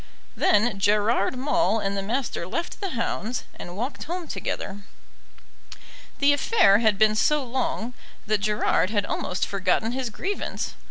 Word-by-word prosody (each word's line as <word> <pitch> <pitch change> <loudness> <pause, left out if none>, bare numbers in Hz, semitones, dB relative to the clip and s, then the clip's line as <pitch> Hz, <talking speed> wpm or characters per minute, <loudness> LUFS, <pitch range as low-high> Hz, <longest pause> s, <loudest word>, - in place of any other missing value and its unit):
Then 210 -1 +2
Gerard 210 +3 +2
Maule 290 -2 +2
and 200 -1 -1
the 195 - -1
Master 230 -4 -2
left 335 - -4
the 395 - -1
hounds 230 +1 -2 0.2
and 175 +1 -8
walked 245 +6 -4
home 345 +1 -4
together. 200 -7 -4 1.4
The 285 0 +4
affair 285 - +4
had 220 -3 +3
been 215 +1 +5
so 295 +6 +2
long 250 -1 -2 0.3
that 215 0 +1
Gerard 210 -2 +2
had 205 -2 0
almost 180 - -2
forgotten 195 +3 0
his 255 -1 -2
grievance. 390 - -3
220 Hz, 145 wpm, -25 LUFS, 200-265 Hz, 1.4 s, been